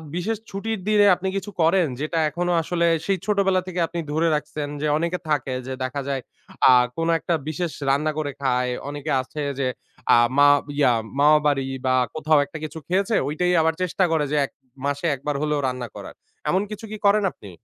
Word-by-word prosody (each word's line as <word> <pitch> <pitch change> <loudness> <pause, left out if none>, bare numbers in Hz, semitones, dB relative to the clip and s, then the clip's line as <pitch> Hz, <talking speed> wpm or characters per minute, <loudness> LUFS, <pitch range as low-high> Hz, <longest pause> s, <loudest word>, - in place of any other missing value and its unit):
বিশেষ 205 +5 -1
ছুটির 220 +2 -3
দিনে 210 -1 +5
আপনি 190 - -4
কিছু 200 +2 -5
করেন, 165 +1 +4
যেটা 155 +2 -1
এখনো 175 +3 -2
আসলে, 170 +1 0 0.2
সেই 195 -1 +1
ছোটবেলা 195 -3 +2
থেকে 180 -1 -4
আপনি 170 - -5
ধরে 160 +2 +1
রাখছেন? 150 0 -4
যে 150 - 0
অনেকে 170 +3 -1
থাকে 140 -3 0
যে 130 - -3
দেখা 130 +2 -3
যায়, 135 -2 -1 0.5
আ - - +9 0.3
কোন 165 0 0
একটা 170 - -1
বিশেষ 165 +1 -2 0.2
রান্না 145 +3 +2
করে 150 -2 -2
খায়, 125 -2 +1 0.2
অনেকে 145 +1 -4
আছে 150 +4 -7 0.2
যে 135 - +1 0.5
আ - - +8 0.2
মা 145 0 +7 0.3
ইয়া 130 -4 +5 0.3
মামাবাড়ি 145 -2 +4 0.2
বা 130 0 +3 0.2
কোথাও 155 -1 +3
একটা 160 - -9
কিছু 155 +1 -6
খেয়েছে, 195 +4 +1
ঐটাই 180 +5 0
আবার 160 0 +2
চেষ্টা 185 +1 0
করে 160 -2 +2
যে 150 - +1
১ - - -13 0.3
মাসে 145 +2 -2
একবার 145 +2 -3
হলেও 150 -1 0
রান্না 125 -1 -3
করার। - - -8 0.4
এমন 185 - +2
কিছু 210 +1 -7
কি 215 - -5
করেন 205 +1 +4
আপনি? 100 - -13
155 Hz, 190 wpm, -23 LUFS, 145-180 Hz, 0.5 s, আ